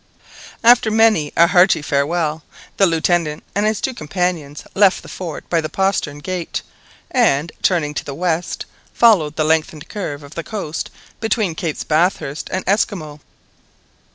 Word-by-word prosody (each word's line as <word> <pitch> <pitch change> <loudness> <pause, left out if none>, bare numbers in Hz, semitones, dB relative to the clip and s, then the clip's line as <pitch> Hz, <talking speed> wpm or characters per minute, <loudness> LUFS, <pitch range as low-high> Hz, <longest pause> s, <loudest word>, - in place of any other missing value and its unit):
After 235 -1 +6
many 215 -9 +3
a 170 - +8
hearty 180 -2 +4
farewell, 155 +2 0 0.4
the 195 - +5
Lieutenant 165 -2 0
and 205 +1 +1
his 215 -1 0
two 265 - -2
companions 160 - -3
left 195 -1 +3
the - - -12
fort 170 -5 -7
by 165 -2 +1
the 155 - -4
postern 190 -5 0
gate, 175 +2 -4 0.5
and, 145 +4 +2
turning 160 -5 +1
to - - -3
the 140 - -6
west, 175 0 -2 0.3
followed 180 -11 +4
the 155 - +1
lengthened 155 -1 0
curve 150 -9 -5
of 140 - -12
the 165 - -5
coast 180 -7 -4 0.3
between 220 -5 0
Capes 160 -1 -3
Bathurst 155 -2 0
and 185 - -2
Esquimaux. 180 -7 -1
170 Hz, 150 wpm, -19 LUFS, 150-195 Hz, 0.5 s, a